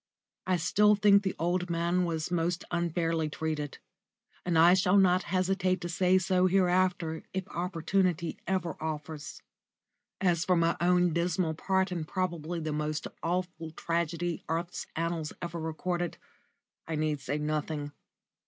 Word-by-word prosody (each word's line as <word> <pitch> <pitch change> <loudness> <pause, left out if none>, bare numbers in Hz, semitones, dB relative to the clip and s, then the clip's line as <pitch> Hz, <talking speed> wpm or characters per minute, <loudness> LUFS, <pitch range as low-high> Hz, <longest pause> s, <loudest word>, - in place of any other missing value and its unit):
I 185 -1 +3
still 210 +5 +4
think 200 -1 +5
the 190 -2 -2
old 175 +2 0
man 170 +2 +1
was 165 0 -2
most 175 +1 0
unfairly 165 -2 0
treated, 150 -2 -3 0.7
and 175 -2 +1
I 170 +2 +7
shall 190 +1 +4
not 185 -1 +5
hesitate 185 0 +1
to 175 - -4
say 185 +1 +3
so 185 0 +2
hereafter 180 -3 +2
if 190 0 -2
opportunity 175 -1 -1
ever 180 -3 -1
offers. 155 -1 -5 0.8
As 175 -3 +2
for 185 -2 +3
my 170 0 +2
own 180 -1 +3
dismal 170 0 0
part 190 +3 0
in 170 -3 -2
probably 170 -1 -2
the 155 -1 -3
most 150 0 -2 0.2
awful 175 -1 -2
tragedy 170 +1 -2
earth's 170 +2 -3
annals 165 -1 -2
ever 170 -1 -5
recorded, 175 +2 -2 0.7
I 160 - -2
need 155 -1 0
say 145 +3 -2
nothing. 150 -1 -2
175 Hz, 140 wpm, -30 LUFS, 160-185 Hz, 0.8 s, I